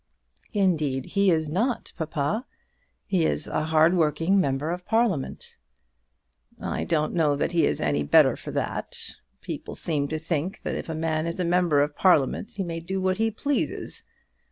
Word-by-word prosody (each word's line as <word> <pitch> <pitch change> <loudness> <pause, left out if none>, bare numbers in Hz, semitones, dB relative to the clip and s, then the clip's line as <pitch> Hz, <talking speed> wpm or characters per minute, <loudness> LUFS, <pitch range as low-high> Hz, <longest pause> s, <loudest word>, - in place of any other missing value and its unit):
"Indeed 155 -10 +1
he 200 -1 +4
is 160 -3 +2
not, 225 - -1
papa. 160 - -2 0.6
He 185 -5 +1
is - - 0
a 155 - -1
hard 160 +2 +4
working 165 +3 +2
member 140 +1 -1
of 180 +1 -4
Parliament." 215 - -1 1.0
"I - - -3
don't 155 -2 0
know 155 -4 +2
that 145 - -1
he 170 -2 +3
is - - -1
any 75 0 +1
better 70 - +5
for - - -9
that. - - -3 0.4
People - - -6
seem 145 -4 -1
to 155 - -2
think 165 +4 -3
that - - -2
if - - -5
a 160 - -2
man 160 0 -1
is 170 - -4
a 180 - +1
member 170 -4 +3
of 145 0 -3
Parliament 180 - +3
he 200 - -2
may 165 -2 -4
do 190 +4 -3
what 185 0 +1
he 225 +1 +2
pleases. 280 +6 -2
165 Hz, 175 wpm, -26 LUFS, 150-190 Hz, 1.0 s, better